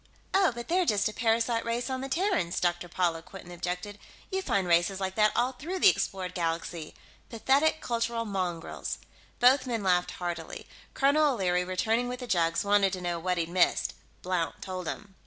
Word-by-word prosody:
"Oh, 385 -4 +4
but 235 0 -6
they're 365 +2 +2
just 210 - +2
a - - -8
parasite 230 +1 +1
race 235 +1 -2
on 260 -1 -3
the 270 - -5
Terrans," 340 - 0
Dr. 175 0 -1
Paula 170 -2 0
Quinton 180 +1 -12
objected. 180 +4 -4 0.3
"You 380 0 0
find 195 - 0
races 175 +3 +2
like 190 -1 -2
that 210 +1 +4
all 245 +2 +2
through 320 +9 -5
the 390 - +7
explored 185 - -2
galaxy 165 -2 -3 0.3
pathetic 280 +7 +2
cultural 230 -1 -1
mongrels." 180 -5 -3 0.4
Both 255 +2 +5
men 230 -4 -2
laughed 180 -1 +2
heartily. 175 -3 -5 0.3
Colonel 285 +1 +4
O'Leary, 180 -4 +1
returning 220 +7 0
with 250 0 -5
the - - -4
jugs, 170 -5 +1
wanted 200 -1 +3
to 185 - -4
know 175 -1 -2
what 180 +1 -1
he'd 165 -1 -1
missed. 180 0 +2 0.3
Blount 180 -3 -1
told 185 -2 -5
him. 200 +2 -6
195 Hz, 180 wpm, -29 LUFS, 180-245 Hz, 0.4 s, the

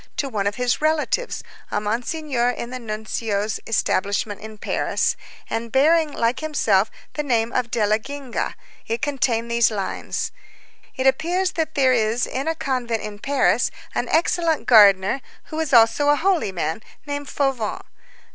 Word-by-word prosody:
to 280 - 0
one 210 -6 -1
of 205 - -1
his 250 +2 0
relatives, 315 +10 0 0.3
a - - 0
Monsignor 245 +4 -1
in 240 0 -4
the 255 - -5
Nuncio's 215 -2 -3
establishment 205 -1 0
in 220 0 -9
Paris, - - 0 0.3
and 230 0 -3
bearing, 310 +3 +4
like 235 -2 0
himself, 225 -10 +2 0.2
the 300 - -2
name 235 -5 0
of 250 -2 0
Della 215 -2 +2
Genga; 275 +1 -4 0.3
it 230 +1 -2
contained 240 -5 0
these 235 -1 +4
lines: 200 -3 -3 0.6
"It 260 - -2
appears 345 +8 +2
that 315 -1 -2
there 265 -3 +4
is 230 0 +1
in 270 +4 -4
a 325 - 0
convent 250 -6 -2
in 210 -1 -7
Paris 280 +4 +2 0.2
an - - -2
excellent 330 0 +1
gardener, 205 +1 +6 0.2
who 315 - -6
is 320 -3 -1
also 240 +4 +5
a 290 - +6
holy 345 - +1
man, 175 +1 -2 0.2
named 285 -1 -4
Fauvent." 265 -7 -1
245 Hz, 155 wpm, -22 LUFS, 220-290 Hz, 0.6 s, gardener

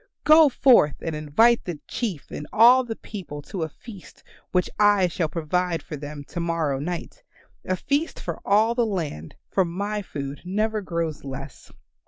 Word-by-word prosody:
Go 310 -1 +7
forth 245 - +5
and 165 -2 -3
invite 160 +11 +3
the 170 -5 -5
Chief 200 - -4
and 150 - -6
all 245 +4 +7
the 230 -2 -5
people 185 -11 -8
to 185 - -6
a 160 - -2
feast 200 - -13 0.3
which 180 -1 +2
I 205 -3 +5
shall 170 -1 -1
provide 170 +2 -1
for 155 - -7
them 145 0 -7
to 175 - -5
morrow 165 -5 -1
night 170 +4 -5 0.4
a 185 - 0
feast 285 - -1
for - - -5
all 215 +3 +3
the 240 0 +1
land, 165 - -4 0.2
for 190 - +3
my 200 +5 -3
food 140 -6 -6
never 215 +4 -1
grows 170 -4 -3
less." 135 0 -9
180 Hz, 170 wpm, -24 LUFS, 155-215 Hz, 0.4 s, Go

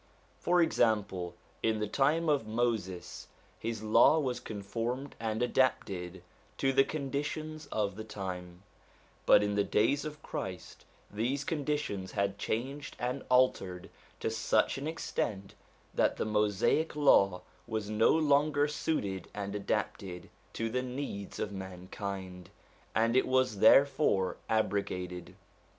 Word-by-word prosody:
For 175 0 +3
example, 100 - +1 0.3
in 110 -1 +1
the 105 - -1
time 150 +8 +2
of 145 -7 +2
Moses, 110 -5 -2 0.3
his 110 -1 -4
Law 110 +8 +6
was 130 -5 -1
conformed 115 +6 -4
and 110 0 -1
adapted 95 -8 0 0.3
to 135 0 +1
the 135 +1 +6
conditions 150 +2 -4
of 105 -6 -1
the 110 - -6
time; 90 -4 -6 0.6
but - - +7
in 105 0 0
the 100 0 +2
days 125 +9 +2
of 150 -1 -7
Christ 90 -1 -6 0.3
these 125 +7 -1
conditions 145 - -2
had 100 0 -1
changed 135 +8 -3
and 125 +2 -3
altered 110 -8 +2 0.3
to - - 0
such 115 +3 +1
an 140 - -4
extent 105 -10 -3 0.4
that - - +2
the - - -1
Mosaic 105 +9 +1
Law 100 -11 +4 0.2
was 110 -2 -3
no 110 +1 +3
longer 145 -1 +3
suited 105 - -2
and 100 -1 -4
adapted 100 -3 -3 0.2
to 115 0 -2
the 125 +2 0
needs 125 -6 -5
of 105 - -3
mankind, 95 -1 -6 0.5
and 115 +2 +3
it 130 - +4
was 130 -5 +2
therefore 110 -6 +4
abrogated. 95 -4 -1
110 Hz, 130 wpm, -31 LUFS, 100-135 Hz, 0.6 s, but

